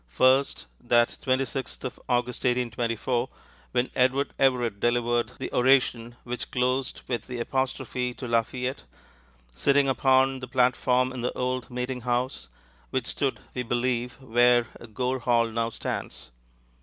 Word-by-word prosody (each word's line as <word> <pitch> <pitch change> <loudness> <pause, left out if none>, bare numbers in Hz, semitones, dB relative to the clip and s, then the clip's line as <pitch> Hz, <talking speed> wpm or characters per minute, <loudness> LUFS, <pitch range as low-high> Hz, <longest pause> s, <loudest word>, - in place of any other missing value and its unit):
First, 130 - +3
that 120 -1 +3
26th 130 0 -2
of 130 - -5
August, 125 0 0
1824, 120 0 0 0.4
when 125 0 0
Edward 130 +2 +2
Everett 120 -6 +2
delivered 120 0 +1
the - - -5
oration, 125 -2 +3
which 125 0 -5
closed 130 +1 -1
with 120 -2 -3
the 125 -2 -5
apostrophe 130 0 -2
to 125 - -6
Lafayette, 125 +3 -1 0.7
sitting 140 - +3
upon 130 0 +3
the 125 - -7
platform 125 0 +2
in 125 - -5
the 125 - -1
old 125 0 -2
meetinghouse, 125 0 -2 0.4
which 130 -3 -1
stood, 135 +2 -1
we 125 - -2
believe, 120 0 -1
where 120 -1 +3 0.3
Gore 130 +3 -1
Hall 120 -1 +3
now 115 0 -1
stands. - - -5
125 Hz, 130 wpm, -26 LUFS, 120-130 Hz, 0.7 s, First